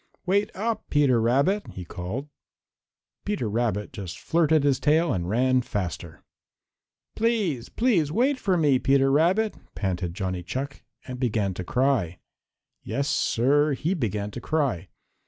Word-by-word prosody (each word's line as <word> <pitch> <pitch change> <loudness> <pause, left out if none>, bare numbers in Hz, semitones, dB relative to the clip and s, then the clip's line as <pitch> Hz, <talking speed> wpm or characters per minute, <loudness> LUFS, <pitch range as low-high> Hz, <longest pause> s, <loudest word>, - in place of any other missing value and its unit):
"Wait 200 +3 +2
up, 220 +2 -3
Peter 135 -5 +3
Rabbit!" 140 - +2
he 90 - -7
called. 95 - -5 1.0
Peter 205 - -2
Rabbit 105 -1 -1
just 95 -7 -6
flirted 160 -2 +2
his 140 -2 +2
tail 160 +1 +3
and 90 -2 -2
ran 130 +4 +2
faster. 90 -8 -5 0.9
"Please, 210 - 0
please 195 - +1
wait 260 - +1
for 190 -6 +1
me, 145 -5 +3
Peter 135 +1 +3
Rabbit," 185 +9 +3 0.2
panted 90 -3 -2
Johnny 95 -2 -3
Chuck, 135 +10 -5 0.2
and 125 -1 -7
began 105 -6 0
to 90 - -5
cry. 120 -6 0 0.6
Yes, 140 +1 -2
Sir, 145 +2 +2
he 155 +7 -1
began 105 - -2
to 120 - -7
cry. 135 - -1
135 Hz, 135 wpm, -25 LUFS, 105-160 Hz, 1.0 s, Peter